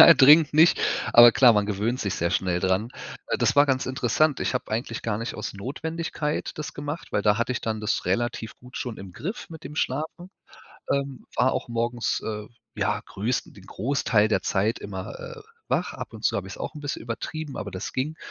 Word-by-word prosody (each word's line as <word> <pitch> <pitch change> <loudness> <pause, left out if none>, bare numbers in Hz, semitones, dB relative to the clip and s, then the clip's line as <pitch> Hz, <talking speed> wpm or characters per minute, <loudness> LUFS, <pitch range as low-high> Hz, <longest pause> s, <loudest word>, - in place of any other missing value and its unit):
Nein, 170 - +10
dringend 150 +2 +7
nicht. 160 +3 +6 0.3
Aber 120 0 +10
klar, 125 -3 +7
man 105 -2 +2
gewöhnt 105 +5 -1
sich 100 - -1
sehr 85 +1 0
schnell 90 -1 +1
dran. 95 +4 +1 0.4
Äh, - - 0
das - - +2
war 145 +1 +6
ganz 130 -2 +1
interessant. 130 +3 +1
Ich - - -1
habe 125 - -3
eigentlich 115 +1 -3
gar 105 -2 -1
nicht 115 - -4
aus 105 - -5
Notwendigkeit 150 +7 -3
das 150 - -5
gemacht, 145 +3 -5
weil 105 - +1
da 105 0 +4
hatte 120 +2 0
ich 125 - -3
dann 110 -1 -2
das 105 - -1
relativ 115 +3 -1
gut 125 +1 -12
schon 120 -3 -4
im 95 -2 -10
Griff 190 - -6
mit 160 -2 -10
dem 150 - -8
Schlafen. 160 +7 -3 0.6
Ähm, 140 -1 -3
war 125 +2 +3
auch - - -3
morgens, 120 0 -1
äh, 105 -1 -4 0.3
ja - - 0
größten 110 +6 -2
den 100 -2 -15
Großteil 110 -1 +1
der 110 - +1
Zeit 105 +4 0
immer, 100 +1 -6
äh, 480 -2 -8 0.3
wach. - - 0
Ab - - -7
und - - -10
zu - - +3
habe - - -3
ich's - - -8
auch - - -5
'n 150 - -8
bisschen 145 - -4
übertrieben, 140 +6 -5
aber 100 - -5
das 95 +2 -5
ging. 145 +5 -2
120 Hz, 215 wpm, -25 LUFS, 105-145 Hz, 0.6 s, Nein